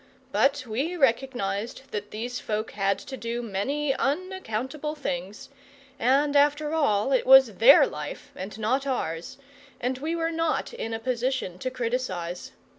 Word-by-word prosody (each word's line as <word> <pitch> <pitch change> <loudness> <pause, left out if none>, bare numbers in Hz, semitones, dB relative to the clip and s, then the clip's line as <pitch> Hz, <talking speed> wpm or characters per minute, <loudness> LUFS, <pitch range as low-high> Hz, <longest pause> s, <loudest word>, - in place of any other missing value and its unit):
But 280 0 +2
we 270 +11 -2
recognized 240 - -1
that 205 0 -4
these 240 +4 -4
folk 215 0 -3
had 195 -1 0
to 270 - -8
do 235 -1 -4
many 270 +8 -1
unaccountable 300 - -2
things, 195 - -5 0.5
and 275 +4 +3
after 295 +1 +3
all 265 -6 +2
it 260 - +3
was 265 -6 +7
THEIR 245 +5 +8
life, 290 - -7
and 195 +3 -7
not 255 +6 0
ours, 245 -1 -3 0.4
and 255 +1 -2
we 320 +4 -2
were 330 0 -1
not 330 +6 -1
in 225 - -4
a - - -4
position 245 -6 -2
to 255 - -2
criticise. 230 -9 -3
255 Hz, 145 wpm, -26 LUFS, 215-285 Hz, 0.5 s, THEIR